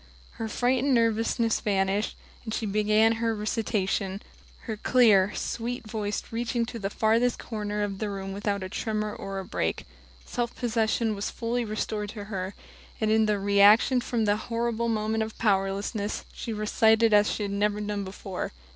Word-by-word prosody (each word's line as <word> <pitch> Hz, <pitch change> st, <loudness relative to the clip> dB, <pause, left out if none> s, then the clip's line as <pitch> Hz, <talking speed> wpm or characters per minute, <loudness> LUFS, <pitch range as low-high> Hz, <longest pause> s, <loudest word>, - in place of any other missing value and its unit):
Her 225 Hz, -, -2 dB
fright 245 Hz, +3 st, +1 dB
and 275 Hz, -2 st, +3 dB
nervousness 230 Hz, 0 st, +2 dB
vanished; 195 Hz, +1 st, 0 dB, 0.3 s
and 220 Hz, -2 st, -3 dB
she 225 Hz, -, -2 dB
began 215 Hz, +2 st, +3 dB
her 225 Hz, -1 st, +1 dB
recitation, 210 Hz, -2 st, -1 dB, 0.4 s
her 220 Hz, -, -4 dB
clear, 210 Hz, -4 st, +4 dB
sweet 235 Hz, 0 st, -3 dB
voice 210 Hz, -1 st, -3 dB
reaching 235 Hz, +1 st, -1 dB
to 230 Hz, 0 st, -7 dB
the 195 Hz, -2 st, -2 dB
farthest 230 Hz, +3 st, +2 dB
corner 210 Hz, -2 st, -3 dB
of 200 Hz, -2 st, -3 dB
the 215 Hz, -, -2 dB
room 195 Hz, -1 st, -5 dB
without 200 Hz, 0 st, -2 dB
a -, -, -3 dB
tremor 215 Hz, +1 st, -2 dB
or 195 Hz, 0 st, -6 dB
a 190 Hz, -, -4 dB
break. -, -, -2 dB, 0.4 s
Self 240 Hz, -1 st, -3 dB
possession 225 Hz, -1 st, 0 dB
was 200 Hz, 0 st, -3 dB
fully 240 Hz, +1 st, -2 dB
restored 210 Hz, -1 st, -3 dB
to 210 Hz, -3 st, -6 dB
her, 195 Hz, -2 st, -5 dB, 0.4 s
and 215 Hz, -1 st, +1 dB
in 220 Hz, 0 st, +4 dB
the 210 Hz, -1 st, +2 dB
reaction 205 Hz, +5 st, +5 dB
from 235 Hz, -2 st, -1 dB
that 205 Hz, 0 st, +2 dB
horrible 235 Hz, +1 st, -1 dB
moment 220 Hz, 0 st, 0 dB
of 220 Hz, 0 st, -4 dB
powerlessness 200 Hz, 0 st, 0 dB
she 230 Hz, -, -5 dB
recited 220 Hz, +1 st, +3 dB
as 210 Hz, 0 st, +5 dB
she 210 Hz, -, -2 dB
had 200 Hz, -, -2 dB
never 205 Hz, +1 st, 0 dB
done 205 Hz, -1 st, -2 dB
before. 190 Hz, -, -5 dB
215 Hz, 170 wpm, -27 LUFS, 205-230 Hz, 0.4 s, reaction